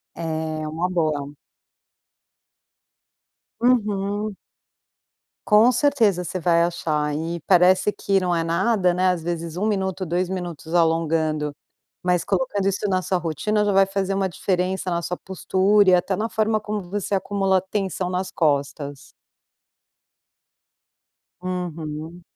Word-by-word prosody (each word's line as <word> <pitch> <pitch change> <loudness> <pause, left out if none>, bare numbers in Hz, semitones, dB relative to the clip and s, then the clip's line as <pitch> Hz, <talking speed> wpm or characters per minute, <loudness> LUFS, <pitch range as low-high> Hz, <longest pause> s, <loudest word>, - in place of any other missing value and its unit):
É 165 - -6 0.4
uma 165 +4 -2
boa. 155 -5 -1 2.3
Uhum. 210 -3 +1 1.1
Com 220 +3 +6
certeza, 235 -9 +2
você 185 - -4
vai 170 -1 +3
achar. 155 -3 -1
E 165 +2 -3
parece 185 +2 +5
que 195 -1 0
não 180 -1 0
é 165 -1 0
nada, 180 +2 +2
né, 185 +1 +2
às 180 -2 0
vezes 170 -1 -4
1 200 +4 0
minuto, 190 -3 -1
2 175 +2 0
minutos 175 -4 -6
alongando, 160 -3 +1 0.5
mas 180 -1 +1
colocando 195 +1 -1
isso 200 +1 -1
na 185 -1 +1
sua 185 0 0
rotina, 175 +6 0
já 205 - +1
vai 195 0 +6
fazer 195 0 -1
uma 195 -1 0
diferença 185 +1 -1
na 170 0 -1
sua 180 +1 -3
postura 190 +2 +2
e - - +6
até 180 +2 +1
na 215 +4 -1
forma 220 -1 +1
como 210 0 -3
você 200 +2 -3
acumula 195 -1 +1
tensão 190 -1 -3
nas 185 +1 -2
costas. 145 -2 -1 2.3
Uhum. 170 -2 -5
185 Hz, 130 wpm, -23 LUFS, 170-195 Hz, 2.3 s, Com